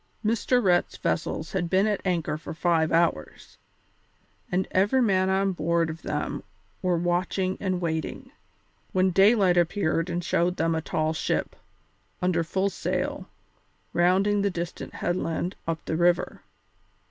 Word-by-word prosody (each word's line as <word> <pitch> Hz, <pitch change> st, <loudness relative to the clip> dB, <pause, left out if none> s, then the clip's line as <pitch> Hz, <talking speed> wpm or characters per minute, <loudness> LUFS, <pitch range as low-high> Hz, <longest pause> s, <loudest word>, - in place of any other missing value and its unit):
Mr. 230 Hz, +3 st, +2 dB
Rhett's 175 Hz, -2 st, +2 dB
vessels 160 Hz, -1 st, -2 dB
had 175 Hz, -3 st, -1 dB
been 190 Hz, +3 st, +3 dB
at 210 Hz, -2 st, 0 dB
anchor 165 Hz, -5 st, 0 dB
for 155 Hz, +1 st, -7 dB
five 165 Hz, -2 st, +1 dB
hours, 165 Hz, -, -1 dB, 0.9 s
and 180 Hz, +1 st, 0 dB
every 205 Hz, +8 st, +3 dB
man 190 Hz, -6 st, +2 dB
on 195 Hz, +1 st, +2 dB
board 170 Hz, -1 st, 0 dB
of 160 Hz, 0 st, -10 dB
them -, -, -3 dB, 0.4 s
were 180 Hz, -2 st, +1 dB
watching 180 Hz, +2 st, 0 dB
and 185 Hz, -2 st, -1 dB
waiting, 160 Hz, -2 st, -3 dB, 0.6 s
when 185 Hz, 0 st, +3 dB
daylight 195 Hz, -1 st, +4 dB
appeared 170 Hz, -1 st, +1 dB
and 175 Hz, +1 st, -2 dB
showed 175 Hz, +2 st, +1 dB
them 165 Hz, +1 st, +1 dB
a 160 Hz, -, -1 dB
tall 155 Hz, 0 st, -1 dB
ship, 155 Hz, -, -2 dB, 0.6 s
under 180 Hz, -2 st, +1 dB
full 190 Hz, +4 st, -1 dB
sail, -, -, -3 dB, 0.6 s
rounding 195 Hz, +4 st, +3 dB
the 200 Hz, -, +2 dB
distant 175 Hz, -1 st, -6 dB
headland 175 Hz, 0 st, -2 dB
up 165 Hz, -1 st, -3 dB
the 160 Hz, -, -2 dB
river. 175 Hz, +1 st, +1 dB
175 Hz, 140 wpm, -26 LUFS, 165-190 Hz, 0.9 s, daylight